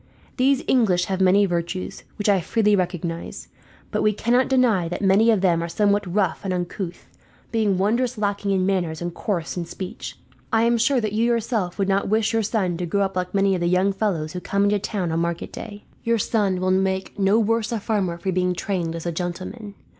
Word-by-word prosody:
These 270 +1 +3
English 190 -8 +3
have 190 0 -2
many 190 +2 +5
virtues, 175 0 -3
which 205 - -2
I 200 -3 +4
freely 210 +3 +2
recognize; 175 -2 -3 0.4
but - - 0
we 215 - +3
cannot 245 +5 +2
deny 235 -10 +3
that 175 +4 -4
many 200 +4 +4
of 215 -4 +3
them 175 -3 +2
are 170 - -3
somewhat 205 0 +1
rough 190 -2 0
and 195 - -2
uncouth, 180 0 -4 0.4
being 215 -4 +1
wondrous 235 +5 +1
lacking 205 -1 -1
in 190 -2 +2
manners 175 -5 0
and 175 0 -4
coarse 175 -3 -3
in 175 - -2
speech. 190 +5 -7 0.3
I 225 -1 +3
am 235 0 +3
sure 255 +3 +3
that 215 -3 -2
you 225 +2 +2
yourself 225 -6 0
would 195 -2 0
not 195 0 +1
wish 220 +1 +1
your 225 - +2
son 195 -5 -1
to 175 0 -3
grow 200 +4 0
up 195 -1 -3
like 180 +1 -2
many 195 0 +3
of 180 - -1
the 175 - +1
young 185 +2 +2
fellows 185 -7 -1
who 180 - -3
come 200 +3 0
into 205 0 +2
town 190 -4 -2
on 165 - 0
market 170 0 -3
day. 205 -2 -8 0.2
Your 230 0 +2
son 200 -3 0
will 185 0 +1
make 190 +1 0
no 195 +2 +4
worse 230 0 +1
a 230 - -1
farmer 195 -5 -1
for 190 +2 -2
being 180 0 0
trained 175 -3 -2
as 165 - -6
a 170 - -1
gentleman. 185 +5 -5
195 Hz, 215 wpm, -23 LUFS, 180-215 Hz, 0.4 s, many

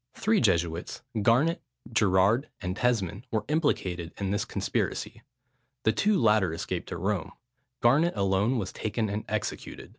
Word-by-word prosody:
Three 215 +1 +2
Jesuits, 85 -6 0 0.2
Garnet, 130 +11 +3 0.3
Gerard, 105 +5 +3
and 90 -2 -3
Tesmond, 110 -2 0
were 110 -2 -1
implicated 95 - 0
in 95 -1 -2
this 105 +1 0
conspiracy: - - -2 0.6
the 110 - +4
two 205 - +2
latter 105 - +3
escaped - - -4
to - - -4
Rome, 95 0 -2 0.5
Garnet 145 +9 +4
alone 100 +5 +2
was 95 -5 -3
taken 110 0 -2
and 105 +2 -3
executed. 110 -2 -4
105 Hz, 140 wpm, -28 LUFS, 95-120 Hz, 0.6 s, the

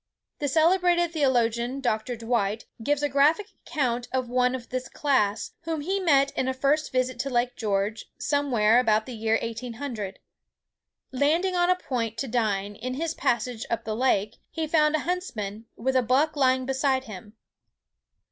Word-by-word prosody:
The 290 - -1
celebrated 345 +3 +3
theologian, 245 -3 +1
Dr. 240 -1 -1
Dwight, 225 -2 -1 0.2
gives 290 +4 0
a - - +3
graphic 295 +9 +3 0.2
account 245 -7 -1
of 255 -2 -1
one 250 +1 +2
of 250 -2 -8
this 255 0 -4
class, 220 -8 0
whom 325 -2 -2
he 380 +6 -1
met 280 -6 +3
in 260 - -2
a 260 - -1
first 285 +3 +1
visit 255 0 0
to 275 - -1
Lake 245 -1 0
George, 210 0 -1
somewhere 245 -6 +3
about 220 -3 +2
the 255 - -7
year 225 0 +1
1800. 230 -2 -5 0.9
Landing 320 +8 +1
on 350 0 +3
a 365 - +5
point 235 -10 -3
to 270 - -2
dine, 205 -4 0
in 255 +4 -4
his 325 +3 -2
passage 235 -4 -1
up 230 - -1
the 215 0 -3
lake, 215 -4 +1
he 320 - -3
found 305 -1 +3
a 310 - 0
huntsman, 230 - -4
with 265 +3 -1
a 255 - +5
buck 270 +6 +2
lying 260 -2 +2
beside 265 0 +1
him. 210 -3 -10
255 Hz, 165 wpm, -26 LUFS, 225-290 Hz, 0.9 s, a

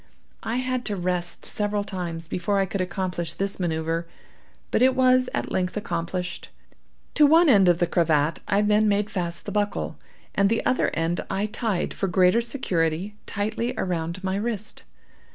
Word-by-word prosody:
I 225 - -3
had 255 0 -1
to 205 - -2
rest 180 -1 -2
several 205 -1 -1
times 175 -4 -5
before 180 +4 -1
I 195 - +3
could 190 +1 -3
accomplish 180 -2 -3
this 195 0 -3
manoeuvre, 165 -1 -1 0.7
but - - +2
it 260 0 +5
was 255 -1 +4
at - - -3
length 180 +2 -1
accomplished. 180 -1 -3 0.6
To 300 -2 +6
one 325 +3 +6
end 195 -7 +6
of 175 - +4
the 175 - +2
cravat 160 -2 +2
I 205 +1 +2
then 210 +1 +3
made 205 0 +1
fast 170 -3 -3
the - - -4
buckle, 205 0 -2 0.3
and 200 0 +3
the 230 - 0
other 255 - +2
end 165 +1 0
I 195 +2 0
tied, 215 -3 -2
for 195 - -2
greater 185 +5 +4
security, 190 - -1
tightly 215 +4 -2
around 170 0 -2
my 190 0 -1
wrist. 215 -1 -4
195 Hz, 170 wpm, -25 LUFS, 175-215 Hz, 0.7 s, To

